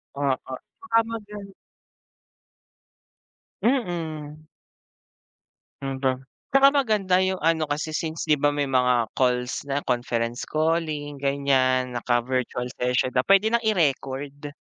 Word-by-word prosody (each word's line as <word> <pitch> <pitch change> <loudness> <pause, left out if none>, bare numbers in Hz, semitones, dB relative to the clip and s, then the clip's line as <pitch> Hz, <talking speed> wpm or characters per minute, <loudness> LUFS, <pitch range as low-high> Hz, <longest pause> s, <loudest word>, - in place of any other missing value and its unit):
Oo, 135 -2 -2 0.3
baka 370 -12 +1
mag 225 -2 -5 2.4
Mm. 165 - -2 1.4
Ang 135 -1 -3
da 130 - +4 0.4
tsaka 275 0 +7
maganda 215 -8 +2
yung 190 -1 -2
ano, 160 0 +2
kasi 155 +1 -3
since 160 0 -4
di 150 - +5
ba 145 +1 +2
may 145 -1 -1
mga 125 -3 +2
calls 125 0 0
na, 140 0 -1
conference 120 -1 -2
calling, 155 -2 -1
ganyan, 130 -3 +1
naka-virtual 125 +1 -1
session 125 +1 +1
na 125 - +3
pwede 195 +2 +5
nang 235 0 +1
i-record. 145 -6 -1
145 Hz, 110 wpm, -24 LUFS, 130-165 Hz, 2.4 s, tsaka